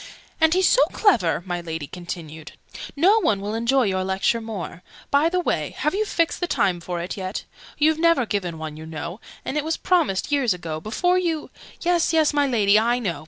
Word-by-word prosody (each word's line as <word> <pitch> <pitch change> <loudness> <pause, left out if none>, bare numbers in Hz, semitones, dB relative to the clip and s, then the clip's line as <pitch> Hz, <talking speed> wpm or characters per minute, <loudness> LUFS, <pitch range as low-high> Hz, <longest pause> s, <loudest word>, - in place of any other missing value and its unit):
"And 320 +1 +4
he's 370 0 +4
so - - +5
clever!" 180 - +2
my 175 -1 -3
Lady 160 -3 -5
continued. 160 -2 -8 0.4
"No 380 +9 +5
one 220 - +1
will 205 +2 -4
enjoy 235 +4 +2
your 190 -3 0
Lecture 190 +5 0
more 210 -6 -6 0.3
by 290 +4 +4
the 365 +1 0
way, 355 - -2
have 300 - 0
you 425 +2 0
fixed 335 -5 0
the 355 - -1
time 180 - +1
for 175 0 -4
it 175 +4 -5
yet? 190 +1 -4 0.3
You've 310 +1 +3
never 335 -6 +3
given 185 -6 -3
one, 155 -1 -6
you 160 0 -9
know: 165 +4 -6 0.3
and 290 - -2
it 300 - 0
was 320 +1 -1
promised 310 - +1
years 260 -9 +2
ago, 160 -3 -5
before 355 - +1
you 330 -4 -2 0.3
"Yes, 345 -1 +2
yes, 315 -2 +3
my 290 -1 +2
Lady, 210 -5 +4
I 235 +2 +2
know! 185 -11 -3
225 Hz, 205 wpm, -23 LUFS, -, 0.4 s, so